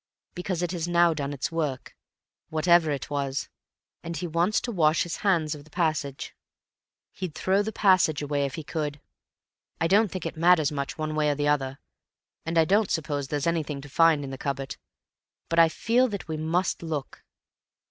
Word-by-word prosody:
"Because 180 -1 -3
it 175 - -1
has 175 -2 -3
now 175 -1 +4
done 140 -2 -3
its 140 +2 -3
work, 150 -6 -3 0.5
whatever 160 +1 +4
it 145 0 -3
was, 140 -1 -2 0.5
and 170 0 -5
he 175 - -3
wants 170 +5 +1
to 240 - -4
wash 155 -5 +3
his 175 - -4
hands 170 -7 +1
of 145 -2 -9
the 155 - -20
passage. 155 -5 -2 0.8
He'd 180 -5 -6
throw 190 +2 +2
the 215 +2 -3
passage 185 -8 +3
away 145 -1 -1
if 135 - -7
he 160 - -6
could. 150 -1 -3 0.8
I 165 - +1
don't 205 +5 +4
think 185 -3 -5
it - - -4
matters 165 -2 +4
much 140 -2 -4
one 155 -1 -3
way 155 -1 +1
or - - +2
another, 145 -2 0 0.7
and 165 +1 -1
I 165 - +6
don't 205 +4 +2
suppose 145 -3 -2
there's 145 0 -2
anything 160 -4 -1
to 145 - -11
find 160 0 +4
in 135 - -6
the 135 - -7
cupboard, 135 -2 -3 0.7
but 165 - +2
I 165 -1 +7
feel 235 +9 +2
that 200 -6 -6
we 160 - -3
must 165 +4 -1
look." 155 -5 -5
160 Hz, 190 wpm, -26 LUFS, 145-175 Hz, 0.8 s, I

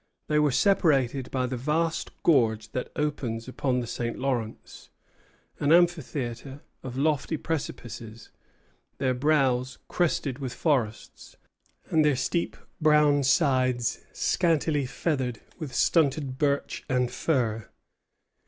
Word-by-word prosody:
They 150 0 +2
were 150 -1 +4
separated 140 - +2
by 130 -1 -1
the 125 0 -3
vast 155 +5 -1
gorge 110 -8 +3
that 125 - -4
opens 130 -6 -2
upon 130 -1 -1
the - - -4
St. 120 0 -4
Lawrence; 120 -5 -4 0.7
an 145 - +1
amphitheatre 145 -6 +1 0.2
of 130 -1 -7
lofty 155 +2 0
precipices, 120 -8 -6 0.7
their 130 -2 +1
brows 130 -2 +1
crested 150 -6 0
with 130 -3 -5
forests, 125 -9 -2 0.6
and 160 -1 +4
their 150 -2 +3
steep 130 +7 -1 0.2
brown 150 -2 +4
sides 130 -3 +2
scantily 155 -5 +1
feathered 130 -5 -2 0.2
with 155 -5 -5
stunted 140 -1 +1
birch 140 -2 0
and 125 -2 +1
fir. 115 -8 -1
135 Hz, 115 wpm, -27 LUFS, 125-150 Hz, 0.7 s, were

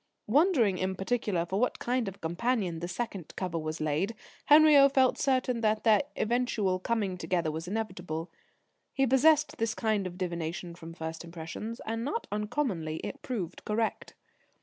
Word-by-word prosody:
Wondering 240 - +3
in 190 0 -1
particular 195 -3 -1
for 190 +3 -2
what 250 - +1
kind 245 -2 -1
of 195 - -5
a - - -24
companion 180 0 -1
the 175 - -4
second 190 -2 -5
cover 180 -3 -2
was 155 0 -4
laid, 155 +9 -1 0.3
Henriot 295 -2 +7
felt 260 -1 +4
certain 255 -3 +1
that 215 -1 +1
their 220 -3 +5 0.2
eventual 215 -5 +1
coming 195 -3 -1
together 165 -1 0
was 160 +2 -5
inevitable. 180 -6 -4 0.6
He 270 - +2
possessed 295 +3 +4
this 225 -1 0
kind 215 -4 0
of 180 0 -9
divination 170 -1 -4
from 165 -1 -10
first 160 0 -5
impressions, 170 +7 -7
and 225 +1 -2
not 450 - -2
uncommonly 210 - -2
it 280 - -6
proved 190 -9 -4
correct. 220 +1 -2
205 Hz, 160 wpm, -29 LUFS, 175-245 Hz, 0.6 s, Henriot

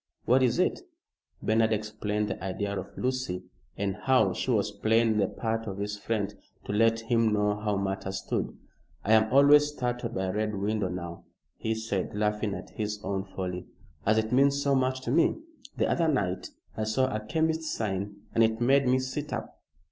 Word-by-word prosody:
"What 130 +3 +4
is 125 -2 +3
it?" 185 - +1 0.6
Bernard 110 0 +3
explained 105 0 -1
the - - -5
idea 100 +2 -2
of 95 - -5
Lucy, 130 -8 -2 0.3
and 100 -1 -1
how 120 -8 +3
she - - -3
was 105 -4 +2
playing 110 +1 +2
the 100 -2 +3
part 115 +1 -3
of 100 -1 -4
his 105 +1 -3
friend, 105 -1 -2 0.3
to - - -3
let 115 +1 +3
him 115 -1 +2
know 105 0 +2
how 105 -1 0
matters 95 0 -2
stood. - - -2 0.5
"I 110 - +4
am 110 0 +4
always 145 +2 +7
startled 120 -4 -3
by 95 - 0
a 95 - -2
red 105 0 -1
window 100 0 0
now," 85 -1 -6 0.3
he 110 0 -2
said, 105 -4 -3
laughing 105 0 0
at - - -9
his 105 -1 -3
own 100 -1 -2
folly, 90 -2 -5 0.4
"as 110 +1 +3
it 110 0 0
means 140 +2 +4
so 140 0 +2
much 130 -1 +1
to 120 - -3
me. 165 +4 +4 0.4
The - - +2
other 165 -1 +2
night 100 - 0 0.3
I 110 - -1
saw 110 +5 +2
a - - 0
chemist's 160 +4 0
sign 100 -1 -3
and 115 - +4
it 110 0 +2
made 135 +2 +4
me 130 +1 +4
sit 130 +3 -3
up." - - -5
110 Hz, 190 wpm, -28 LUFS, 100-125 Hz, 0.6 s, always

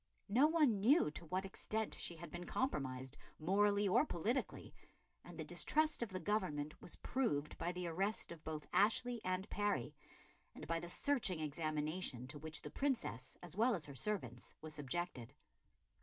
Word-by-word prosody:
No 255 +9 +6
one 300 -10 +4
knew 240 - +5
to 165 +2 -2
what 185 +3 -1
extent 215 +2 -2
she 170 - -3
had 170 +1 -9
been 175 0 -6
compromised, 130 - -2 0.2
morally 200 +4 +3
or 190 - +5
politically, 235 - -2 0.5
and - - -10
the - - -3
distrust 310 -2 +2
of 235 - -1
the 185 - -4
Government 165 -8 -1
was - - -8
proved 155 - 0
by 175 - 0
the 180 0 -4
arrest 195 +6 -1
of 165 -2 -9
both 155 -1 -4
Ashley 230 +3 +3
and 185 +2 -1
Parry, 205 -12 0 0.6
and - - -7
by 165 0 0
the 175 - -6
searching 220 - +1
examination 155 -2 -1
to 145 - -5
which 155 0 -4
the 150 - -6
Princess, 240 - -1
as 175 -1 -8
well 230 +3 +4
as 160 -5 -4
her 140 - -8
servants, 130 - -3
was 155 0 -7
subjected. 145 -3 -3
180 Hz, 170 wpm, -39 LUFS, 150-215 Hz, 0.6 s, No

